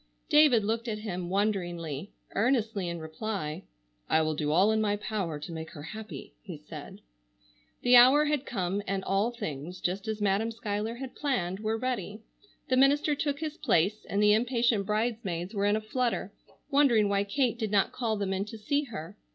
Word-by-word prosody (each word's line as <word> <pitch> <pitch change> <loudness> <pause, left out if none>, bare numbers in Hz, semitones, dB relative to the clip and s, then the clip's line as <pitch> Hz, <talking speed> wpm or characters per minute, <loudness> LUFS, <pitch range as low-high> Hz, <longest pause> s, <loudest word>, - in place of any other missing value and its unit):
David 295 -7 +6
looked 225 +3 -1
at 215 -2 -2
him 185 -5 -4
wonderingly, 175 -5 -2 0.2
earnestly, 220 -4 +1
in 170 - -4
reply: 160 0 -4 0.4
"I 160 - +4
will 155 0 0
do 150 -1 -1
all 190 +7 +4
in 220 0 +2
my 205 -1 +1
power 200 -6 -3
to 150 +3 -8
make 160 -1 -6
her 145 - -9
happy," 185 - -8
he - - -8
said. - - -10 0.8
The 245 0 +6
hour 265 +5 +7
had 295 -2 0
come, 195 -5 -2
and 195 0 -1
all 195 +4 +1
things, 175 - -6
just 195 +5 -2
as 220 -1 -2
Madam 205 +2 +1
Schuyler 220 -1 -3
had 260 +1 -7
planned, 195 -11 -1
were 220 +1 -1
ready. 225 -3 -3 0.4
The 255 - +2
minister 285 +3 +4
took 285 0 -2
his 310 -1 -4
place, 205 - +1
and 205 +1 +1
the 210 0 +6
impatient 230 -3 +2
bridesmaids 210 -4 -1
were 200 -1 0
in 205 +1 +3
a 220 - -1
flutter, 225 -2 -2 0.4
wondering 260 -7 +4
why 200 0 +1
Kate 235 +3 0
did 220 -3 -1
not 200 -1 +2
call 225 -4 -1
them 195 -1 -1
in 190 +1 -1
to 225 +1 -8
see 285 +7 0
her. 190 - -8
210 Hz, 185 wpm, -29 LUFS, 190-235 Hz, 0.8 s, hour